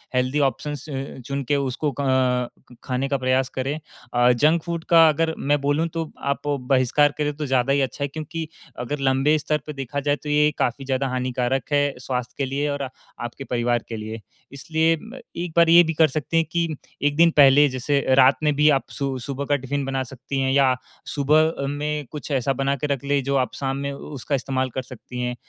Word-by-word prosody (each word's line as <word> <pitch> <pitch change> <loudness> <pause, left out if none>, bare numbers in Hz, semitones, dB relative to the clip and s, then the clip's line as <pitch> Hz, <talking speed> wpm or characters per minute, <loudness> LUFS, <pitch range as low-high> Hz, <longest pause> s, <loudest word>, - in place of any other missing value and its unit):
Healthy 130 +3 +1
options 145 +1 -1
अ, 135 -1 -5
चुन 140 0 -2
के 140 +3 0
उसको 140 +2 -1
अ, 140 +1 -4 0.8
खाने 130 +1 -1
का 140 - +1
प्रयास 130 0 +1
करें। 135 +4 -2 0.3
अ, 120 0 +5
जंक 155 +7 +3
फूड 170 -1 -4
का 165 -1 +7
अगर 160 +1 0
मैं 145 +1 +1
बोलूँ 145 +4 +1
तो 165 -2 -3
आप 140 0 -1
बहिष्कार 140 +1 +2
करें 150 -1 -1
तो 150 - -4
ज़्यादा 130 0 +2
ही 140 - +2
अच्छा 135 +2 -2
है, - - 0
क्योंकि 155 +2 -6 0.3
अगर 140 +4 -3
लंबे 135 +3 +3
स्तर 150 +1 0
पर 150 - -5
देखा 135 +1 -4
जाए 145 +1 +1
तो 150 - -5
ये 150 0 +4
काफ़ी 130 +3 -1
ज़्यादा 135 0 0
हानिकारक 125 +1 -1
है 145 -1 +2
स्वास्थ्य 125 -1 -4
के 140 - 0
लिए 145 +2 -1
और 140 -1 -2
आ 135 - -4 0.4
आपके 120 +3 -7
परिवार 120 -2 0
के 115 - -4
लिए। 110 +1 -6 0.3
इसलिए 160 +3 +1
म 235 +4 -10 0.2
एक 170 -1 -4
बार 170 -1 +6
ये 170 +1 +8
भी 165 -1 -2
कर 160 0 +5
सकते 155 +3 -2
हैं 165 - +3
कि 170 -1 +1 0.3
1 145 0 +1
दिन 170 0 +6
पहले 145 +1 +7
जैसे 130 +2 0 0.2
रात 135 0 +6
में 150 -1 +3
भी 150 +1 +5
आप 135 -2 +2
सु 135 -2 -3
सुबह 140 +3 -4
का 145 - +2
टिफिन 140 +1 -3
बना 135 -1 -1
सकती 135 +2 -5
हैं 130 0 +1
या 135 -2 +4 0.4
सुबह 155 +2 +4
अ, 140 -3 -4
में 150 +1 -3
कुछ 150 0 -7
ऐसा 135 0 +1
बना 135 +1 0
के 140 +2 -3
रख 140 -2 -2
लें 140 - 0
जो 140 +1 -1
आप 130 - 0
शाम 135 -1 -2
में 140 0 -3
उसका 140 0 -4
इस्तेमाल 130 0 -1
कर 130 - -1
सकती 125 0 -8
हैं 125 0 -2
140 Hz, 220 wpm, -23 LUFS, 130-150 Hz, 0.8 s, ये